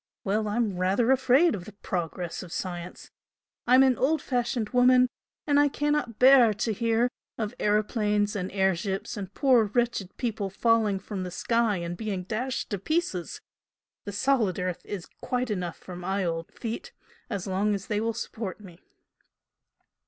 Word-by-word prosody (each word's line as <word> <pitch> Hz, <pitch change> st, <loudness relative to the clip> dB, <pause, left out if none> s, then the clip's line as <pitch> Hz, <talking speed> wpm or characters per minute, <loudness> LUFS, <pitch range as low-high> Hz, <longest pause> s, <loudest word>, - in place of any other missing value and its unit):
Well, 210 Hz, +2 st, 0 dB
I'm 210 Hz, -3 st, 0 dB
rather 195 Hz, +7 st, +2 dB
afraid 265 Hz, +5 st, +4 dB
of 185 Hz, -4 st, -5 dB
the 215 Hz, -, -11 dB
'progress 175 Hz, -3 st, -4 dB
of 180 Hz, -, -10 dB
science.' 180 Hz, -1 st, -6 dB, 0.6 s
I'm 255 Hz, +2 st, +7 dB
an 260 Hz, -2 st, +3 dB
old 305 Hz, +4 st, +2 dB
fashioned 240 Hz, -3 st, -1 dB
woman 250 Hz, 0 st, +5 dB, 0.4 s
and 285 Hz, -1 st, +3 dB
I 290 Hz, -, +5 dB
cannot 295 Hz, -5 st, -1 dB
bear 250 Hz, -4 st, +7 dB
to 220 Hz, +2 st, -1 dB
hear 230 Hz, +3 st, +2 dB, 0.3 s
of 215 Hz, 0 st, -3 dB
aeroplanes 210 Hz, 0 st, +1 dB
and 185 Hz, -2 st, -3 dB
air 190 Hz, -1 st, +2 dB
ships 195 Hz, +6 st, -3 dB
and 195 Hz, -3 st, -6 dB
poor 255 Hz, -5 st, +4 dB
wretched 235 Hz, -3 st, -1 dB
people 215 Hz, -5 st, -2 dB
falling 220 Hz, 0 st, +2 dB
from 195 Hz, 0 st, -6 dB
the 180 Hz, -, -4 dB
sky 230 Hz, +3 st, +1 dB
and 170 Hz, 0 st, -4 dB
being 195 Hz, -2 st, -3 dB
dashed 245 Hz, +7 st, -3 dB
to 200 Hz, -, -1 dB
pieces. 310 Hz, -, -2 dB, 0.6 s
The 205 Hz, -, -4 dB
solid 220 Hz, -3 st, +1 dB
earth 180 Hz, -1 st, -2 dB
is 195 Hz, -5 st, -5 dB, 0.2 s
quite 250 Hz, -1 st, -1 dB
good -, -, +1 dB
enough 175 Hz, -2 st, -4 dB
for 180 Hz, -, -10 dB
my 190 Hz, +2 st, -2 dB
old 165 Hz, -1 st, -3 dB
feet 240 Hz, -, -6 dB, 0.4 s
as 200 Hz, -5 st, -3 dB
long 200 Hz, +2 st, +1 dB
as 195 Hz, -, -6 dB
they 210 Hz, -1 st, -1 dB
will 230 Hz, +1 st, 0 dB
support 220 Hz, -4 st, -5 dB
me!" 180 Hz, -5 st, -13 dB
210 Hz, 165 wpm, -27 LUFS, 190-245 Hz, 0.6 s, I'm